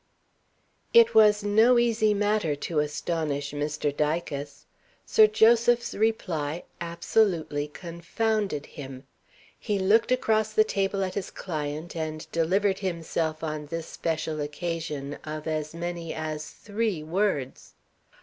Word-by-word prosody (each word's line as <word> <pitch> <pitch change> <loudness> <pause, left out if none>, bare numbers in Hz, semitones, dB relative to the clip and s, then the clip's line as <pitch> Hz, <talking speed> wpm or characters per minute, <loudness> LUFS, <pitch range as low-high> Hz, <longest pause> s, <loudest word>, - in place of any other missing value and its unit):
It 465 0 +7
was 210 -1 +6
no 220 +4 +5
easy 225 -3 +3
matter 205 -6 +1
to 150 +2 -2
astonish 150 -1 -2
Mr. 145 0 -2
Dicas. 150 -2 -2 0.4
Sir 215 - +6
Joseph's 235 +2 +4
reply 175 -8 -1 0.2
absolutely 170 -3 0
confounded 170 +2 -2
him. 135 -3 -9 0.6
He 210 -3 -1
looked 210 +5 +3
across 220 -4 +1
the 215 - +5
table 195 -2 -1
at 185 -1 -3
his 200 - -4
client 155 -1 -5
and 155 -1 -4
delivered 190 +4 +1
himself 165 -3 -2
on 155 -1 -4
this 165 +1 -4
special 160 -2 -3
occasion 150 -2 -4
of 155 0 -6
as 155 0 -3
many 170 -1 -4
as 155 -1 -4
three 210 -6 -3
words. 160 -6 -2
170 Hz, 120 wpm, -27 LUFS, 150-210 Hz, 0.6 s, It